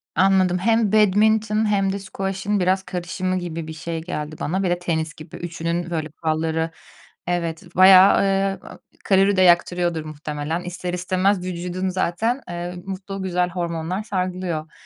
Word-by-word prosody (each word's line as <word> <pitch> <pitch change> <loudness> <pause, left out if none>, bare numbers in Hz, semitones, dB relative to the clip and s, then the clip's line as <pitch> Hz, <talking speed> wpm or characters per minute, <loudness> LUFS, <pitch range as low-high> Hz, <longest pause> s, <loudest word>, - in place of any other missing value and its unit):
Anladım. 185 -1 +3
Hem 225 +1 +2
badminton 215 +1 +3
hem 195 -1 +1
de 200 - -3
squash'ın 195 +1 -2
biraz 185 +1 +1
karışımı 185 +1 -3
gibi 165 -2 -5
bir 160 - -6
şey 165 +1 -5
geldi 155 -2 -5
bana. 190 +5 -1
Bir 180 - +1
de 175 0 0
tenis 160 -3 -2
gibi 155 -1 -12
üçünün, 170 0 -3
böyle, 160 -2 -3
kuralları 160 +1 -1 0.6
evet 170 -1 -3
bayağı, 185 +1 +8
ııı, 195 0 -1 0.3
kalori 195 0 +4
de - - +4
yaktırıyordur 175 -2 +3
muhtemelen, 150 +2 -4
ister 180 0 -5
istemez 185 +1 0
vücudun 180 +1 -3
zaten, 205 +8 -1
eee, 175 +1 -5
mutlu, 195 0 -6
güzel 180 -1 0
hormonlar 170 +2 -3
salgılıyor. 180 -5 -3
180 Hz, 145 wpm, -22 LUFS, 170-195 Hz, 0.6 s, bayağı